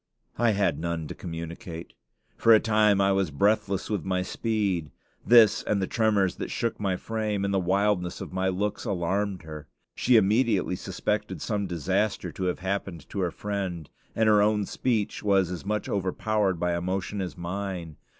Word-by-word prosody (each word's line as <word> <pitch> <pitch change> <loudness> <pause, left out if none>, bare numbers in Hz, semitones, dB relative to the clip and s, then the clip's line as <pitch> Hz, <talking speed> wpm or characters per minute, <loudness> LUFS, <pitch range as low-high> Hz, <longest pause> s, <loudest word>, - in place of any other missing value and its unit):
I 115 -2 +4
had 100 -7 +1
none 85 -1 -3
to - - -4
communicate. 85 0 -7 0.4
For 115 -1 +6
a - - +6
time 105 -2 +3
I 100 0 +3
was 95 -3 +1
breathless 100 +5 +1
with 105 -7 -2
my 90 -1 0
speed. 100 -6 -1 0.3
This, 115 -2 +6
and 105 - 0
the 95 - 0
tremors 105 -4 +1
that - - -4
shook 115 - -2
my 95 -3 0
frame, 105 -1 -2
and 100 - -1
the 95 - +3
wildness 95 -1 +1
of - - -7
my 95 0 0
looks, 100 +2 -1
alarmed 95 +1 -1
her. 75 -2 -9 0.3
She 125 - +3
immediately 105 -2 +2
suspected 105 +3 -3
some 105 -3 -2
disaster 95 +5 -1
to 95 - -4
have 90 - 0
happened 95 -4 -4
to 100 - -3
her 90 -2 +1
friend, 95 -6 -4 0.2
and 110 -1 +2
her 105 -1 +6
own 105 0 +2
speech 110 -3 -1
was 95 -3 +2
as 90 +1 -6
much 105 0 -1
overpowered 100 0 0
by 90 0 0
emotion 95 +3 -2
as 90 -1 -5
mine. 90 -2 -4
100 Hz, 175 wpm, -27 LUFS, 90-105 Hz, 0.4 s, For